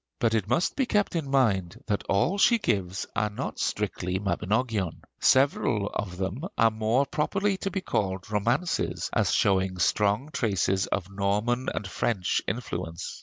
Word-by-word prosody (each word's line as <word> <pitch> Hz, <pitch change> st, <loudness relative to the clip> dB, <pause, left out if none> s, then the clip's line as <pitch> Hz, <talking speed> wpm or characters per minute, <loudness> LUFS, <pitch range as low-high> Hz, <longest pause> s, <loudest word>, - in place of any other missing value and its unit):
But 115 Hz, -1 st, +1 dB
it 110 Hz, -3 st, 0 dB
must 125 Hz, +10 st, +1 dB
be 265 Hz, -3 st, +1 dB
kept 205 Hz, -5 st, +1 dB
in 155 Hz, -5 st, -2 dB
mind 110 Hz, -5 st, +1 dB
that 105 Hz, -2 st, -1 dB
all 135 Hz, -, +2 dB
she 235 Hz, +3 st, +5 dB
gives 95 Hz, -, -1 dB
are 105 Hz, +1 st, +1 dB
not 105 Hz, -, -5 dB
strictly 90 Hz, +1 st, -1 dB
'Mabinogion'; 100 Hz, +1 st, -1 dB, 0.2 s
several 120 Hz, -6 st, +3 dB
of 90 Hz, -3 st, -4 dB
them 95 Hz, +7 st, -3 dB, 0.2 s
are 115 Hz, 0 st, +5 dB
more 110 Hz, +5 st, +1 dB
properly 195 Hz, +8 st, 0 dB
to 195 Hz, -, -3 dB
be 195 Hz, -1 st, -3 dB
called 95 Hz, -, -2 dB
romances, 120 Hz, -, 0 dB
as -, -, +2 dB
showing 95 Hz, -1 st, +2 dB
strong 105 Hz, -, +1 dB
traces 95 Hz, -3 st, +1 dB
of 95 Hz, 0 st, -3 dB
Norman 105 Hz, +6 st, 0 dB
and 105 Hz, -, -4 dB
French 95 Hz, -1 st, 0 dB
influence. 90 Hz, -8 st, -4 dB
105 Hz, 155 wpm, -27 LUFS, 95-130 Hz, 0.2 s, she